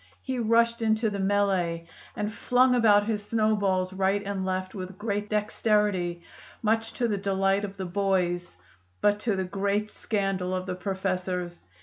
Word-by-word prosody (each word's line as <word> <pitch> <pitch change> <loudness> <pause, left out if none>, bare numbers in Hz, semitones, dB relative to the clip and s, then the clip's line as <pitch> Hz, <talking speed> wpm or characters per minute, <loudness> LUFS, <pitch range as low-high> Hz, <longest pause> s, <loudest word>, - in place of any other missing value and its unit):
He 260 -2 -2
rushed 235 +1 +3
into 220 0 +2
the 200 - -3
mêlée 190 -4 +1 0.3
and 210 +1 -2
flung 250 +2 +3
about 210 -4 +5
his 210 -2 -2
snowballs 205 -4 +1
right 195 +1 +1
and 200 -1 -2
left 185 0 -2
with 185 -2 -7
great 205 0 -2
dexterity, 210 -4 +1 0.4
much 225 +1 +1
to 240 - 0
the 205 -3 -1
delight 195 0 +1
of 200 -1 -5
the 190 - -4
boys 180 - 0 0.4
but 205 0 +3
to 215 -1 0
the 190 - -1
great 200 +3 -1
scandal 195 -3 -1
of 185 0 -3
the 185 - -3
professors. 185 -2 -3
200 Hz, 155 wpm, -27 LUFS, 185-215 Hz, 0.4 s, about